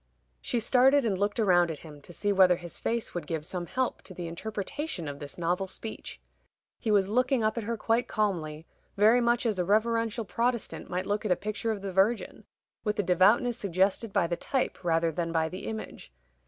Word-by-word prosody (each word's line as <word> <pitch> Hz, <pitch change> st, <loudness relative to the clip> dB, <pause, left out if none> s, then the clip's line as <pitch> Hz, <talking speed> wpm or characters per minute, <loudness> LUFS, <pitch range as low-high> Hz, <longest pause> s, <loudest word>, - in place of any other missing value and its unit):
She 240 Hz, -, -1 dB
started 265 Hz, +4 st, +4 dB
and 205 Hz, -4 st, +1 dB
looked 205 Hz, +3 st, -1 dB
round 180 Hz, -6 st, +4 dB
at 160 Hz, -, -4 dB
him, 150 Hz, -2 st, -11 dB
to 175 Hz, -, -13 dB
see 205 Hz, +4 st, -1 dB
whether 185 Hz, -2 st, +6 dB
his 175 Hz, -1 st, -8 dB
face 235 Hz, 0 st, -2 dB
would 175 Hz, -, -5 dB
give 160 Hz, -2 st, -3 dB
some 175 Hz, 0 st, -4 dB
help 255 Hz, +5 st, -1 dB
to 185 Hz, -, -12 dB
the 175 Hz, -, -5 dB
interpretation 205 Hz, -, -4 dB
of 145 Hz, 0 st, -6 dB
this 145 Hz, -1 st, -8 dB
novel 180 Hz, +3 st, 0 dB
speech. 220 Hz, +3 st, -7 dB, 0.6 s
He 225 Hz, -, -3 dB
was 200 Hz, -2 st, +4 dB
looking 255 Hz, +3 st, +2 dB
up 215 Hz, 0 st, +1 dB
at 230 Hz, -3 st, -3 dB
her 230 Hz, +1 st, -2 dB
quite 230 Hz, +2 st, +1 dB
calmly, 165 Hz, -7 st, -2 dB, 0.3 s
very 220 Hz, +4 st, +5 dB
much 240 Hz, +1 st, +2 dB
as 215 Hz, -5 st, 0 dB
a -, -, +2 dB
reverential 230 Hz, +3 st, +1 dB
Protestant 235 Hz, +4 st, -2 dB
might 180 Hz, +1 st, -2 dB
look 205 Hz, +1 st, -1 dB
at 215 Hz, -, -1 dB
a -, -, +5 dB
picture 215 Hz, +3 st, -3 dB
of 205 Hz, -3 st, -4 dB
the 195 Hz, -2 st, -4 dB
Virgin, 200 Hz, +5 st, +1 dB, 0.4 s
with 210 Hz, -1 st, -1 dB
a 205 Hz, -, +1 dB
devoutness 205 Hz, +7 st, +3 dB
suggested 195 Hz, +3 st, +1 dB
by 175 Hz, -, +2 dB
the 170 Hz, +1 st, -1 dB
type 260 Hz, 0 st, -2 dB
rather 165 Hz, -1 st, +2 dB
than 165 Hz, +1 st, -2 dB
by 160 Hz, -1 st, +1 dB
the 185 Hz, +3 st, -7 dB
image. 220 Hz, -, -7 dB
200 Hz, 210 wpm, -28 LUFS, 175-230 Hz, 0.6 s, whether